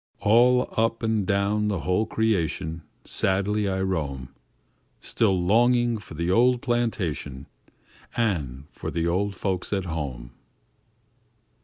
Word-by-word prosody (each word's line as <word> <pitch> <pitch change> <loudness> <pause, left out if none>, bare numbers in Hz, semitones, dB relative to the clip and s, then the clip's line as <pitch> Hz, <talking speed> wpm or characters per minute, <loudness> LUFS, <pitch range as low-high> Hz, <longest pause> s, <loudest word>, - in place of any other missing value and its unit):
"All 125 +4 +4
up 115 +1 0
an' 110 -3 +1
down 100 +1 +1
the 100 -5 -1
whole 90 +5 +1
creation, 85 -8 -1 0.2
Sadly 100 +2 0
I 95 0 -1
roam, 70 -9 -2 0.7
Still 95 -5 +1
longing 120 +5 +3
for 85 - -11
the 85 +3 -1
old 120 +4 +3
plantation, 95 - -2 0.7
An' 75 - -1
for - - -6
the 85 0 -1
old 95 +4 0
folks 95 -1 -2
at 95 -2 -1
home." 70 -8 -5
100 Hz, 120 wpm, -25 LUFS, 85-110 Hz, 0.7 s, All